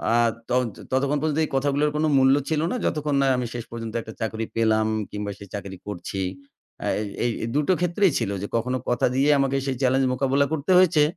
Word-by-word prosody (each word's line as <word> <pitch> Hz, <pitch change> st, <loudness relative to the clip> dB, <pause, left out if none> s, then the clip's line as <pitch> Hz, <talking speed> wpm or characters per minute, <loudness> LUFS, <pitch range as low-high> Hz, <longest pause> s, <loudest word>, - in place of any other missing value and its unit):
আর 120 Hz, 0 st, +4 dB, 0.2 s
তন 125 Hz, +1 st, +3 dB, 0.3 s
ততক্ষণ 140 Hz, +2 st, +1 dB
পর্যন্ত 155 Hz, 0 st, 0 dB
এই -, -, -9 dB
কথাগুলোর 145 Hz, +2 st, +2 dB
কোনো 155 Hz, -, +2 dB
মূল্য 135 Hz, 0 st, +5 dB
ছিল 155 Hz, -1 st, +1 dB
না -, -, -1 dB
যতক্ষণ 150 Hz, -2 st, 0 dB
না 135 Hz, -, +3 dB
আমি 125 Hz, -, -1 dB
শেষ 120 Hz, -2 st, -4 dB
পর্যন্ত 115 Hz, -1 st, -6 dB
একটা 110 Hz, -1 st, -10 dB
চাকরি 110 Hz, 0 st, -2 dB
পেলাম 110 Hz, -1 st, +2 dB, 0.2 s
কিংবা 105 Hz, 0 st, -4 dB
সে 100 Hz, -, -10 dB
চাকরি 100 Hz, -2 st, -6 dB
করছি। 95 Hz, 0 st, -4 dB, 0.6 s
আ -, -, -1 dB
এই 105 Hz, -, -3 dB, 0.2 s
এই 120 Hz, -, +2 dB, 0.2 s
দুটো 150 Hz, +4 st, +2 dB
ক্ষেত্রেই 180 Hz, +1 st, +2 dB
ছিল 110 Hz, -4 st, -1 dB
যে 100 Hz, -, -3 dB
কখনো 125 Hz, +3 st, -1 dB
কথা 120 Hz, 0 st, +2 dB
দিয়ে 135 Hz, +3 st, +3 dB
আমাকে 135 Hz, 0 st, +1 dB
সেই 135 Hz, -1 st, -1 dB
চ্যালেঞ্জ 130 Hz, +1 st, +3 dB
মোকাবিলা 135 Hz, +2 st, +2 dB
করতে 155 Hz, +3 st, -1 dB
হয়েছে 165 Hz, -5 st, +5 dB
130 Hz, 205 wpm, -24 LUFS, 115-145 Hz, 0.6 s, মূল্য